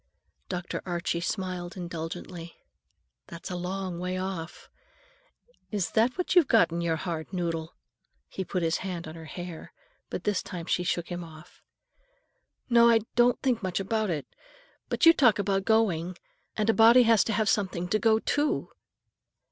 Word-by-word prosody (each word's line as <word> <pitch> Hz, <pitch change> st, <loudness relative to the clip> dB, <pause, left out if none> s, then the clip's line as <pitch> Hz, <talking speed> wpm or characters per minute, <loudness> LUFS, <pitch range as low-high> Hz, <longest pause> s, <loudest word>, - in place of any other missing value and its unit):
Dr. 180 Hz, -1 st, -4 dB
Archie 170 Hz, -1 st, -2 dB
smiled 185 Hz, -1 st, -4 dB
indulgently. 170 Hz, 0 st, -6 dB, 0.7 s
"That's 170 Hz, +2 st, -8 dB
a -, -, -3 dB
long 180 Hz, 0 st, -4 dB
way 180 Hz, +1 st, -2 dB
off. 185 Hz, -3 st, -5 dB, 1.0 s
Is 205 Hz, -5 st, -2 dB
that 230 Hz, +6 st, +2 dB
what 360 Hz, -, -1 dB
you've 350 Hz, -6 st, +6 dB
got 220 Hz, -9 st, +4 dB
in 170 Hz, +1 st, -2 dB
your 165 Hz, -1 st, +1 dB
hard 160 Hz, -1 st, -5 dB
noddle?" 165 Hz, -3 st, -3 dB, 0.5 s
He 190 Hz, -, -5 dB
put 180 Hz, -1 st, -2 dB
his 165 Hz, 0 st, +1 dB
hand 180 Hz, -4 st, -5 dB
on 155 Hz, -, -7 dB
her 165 Hz, -1 st, -10 dB
hair, 175 Hz, 0 st, -8 dB, 0.4 s
but -, -, -5 dB
this 205 Hz, -1 st, 0 dB
time 175 Hz, -2 st, -7 dB
she 180 Hz, -, 0 dB
shook 175 Hz, -1 st, -2 dB
him 175 Hz, -1 st, -4 dB
off. 155 Hz, 0 st, -14 dB, 1.1 s
"No, 235 Hz, -1 st, +6 dB
I 225 Hz, -1 st, +5 dB
don't 240 Hz, 0 st, +4 dB
think 250 Hz, -4 st, +1 dB
much 185 Hz, -2 st, -2 dB
about 215 Hz, +2 st, -1 dB
it. 155 Hz, -5 st, -2 dB, 0.6 s
But -, -, +1 dB
you 330 Hz, -, +9 dB
talk 240 Hz, -9 st, +4 dB
about 195 Hz, -1 st, 0 dB
going, 185 Hz, -6 st, +1 dB, 0.4 s
and 215 Hz, 0 st, 0 dB
a 225 Hz, -, +4 dB
body 230 Hz, +3 st, +7 dB
has 225 Hz, -2 st, +5 dB
to 225 Hz, -, -1 dB
have 215 Hz, 0 st, +1 dB
something 185 Hz, -5 st, 0 dB
to 215 Hz, -, +2 dB
go 220 Hz, -1 st, +4 dB
_to! 290 Hz, +6 st, 0 dB
185 Hz, 165 wpm, -28 LUFS, 170-220 Hz, 1.1 s, you